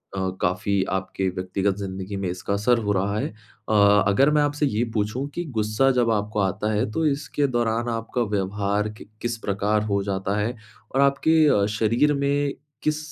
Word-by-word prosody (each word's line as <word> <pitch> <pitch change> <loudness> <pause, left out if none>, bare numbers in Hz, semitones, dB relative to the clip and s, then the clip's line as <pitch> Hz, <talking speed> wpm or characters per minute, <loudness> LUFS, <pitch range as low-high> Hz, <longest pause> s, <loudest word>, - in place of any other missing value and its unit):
अ, 95 -1 -1
काफ़ी 100 +2 +1
आपके 95 0 -2
व्यक्तिगत 95 +1 -1
ज़िंदगी 95 0 -5
में 95 -2 -2
इसका 90 +2 -3
असर 110 +4 +2
हो 105 -2 -1
रहा 100 +2 0
है - - -1 0.4
अ, 110 - +1 0.3
अगर 135 +9 +4
मैं 150 - +3
आपसे 145 0 +1
ये 120 -3 0
पूछूँ 110 +6 -1
कि 175 - -2
गुस्सा 110 +5 +2
जब 120 -3 +2
आपको 105 0 -1
आता 105 +3 0
है, 105 0 0
तो 160 +7 0
इसके 145 0 0
दौरान 120 -1 0
आपका 115 +2 -2
व्यवहार 100 +2 -1
क - - -9 0.2
किस 120 -1 -1
प्रकार 105 0 0
हो 100 -2 0
जाता 100 +1 -2
है? 115 +4 -1 0.4
और 135 - +4
आपके 140 +3 +3 0.3
अ, - - +3
शरीर 115 +7 +2
में 140 0 0 0.3
किस 155 0 +1
105 Hz, 185 wpm, -24 LUFS, 100-125 Hz, 0.4 s, अगर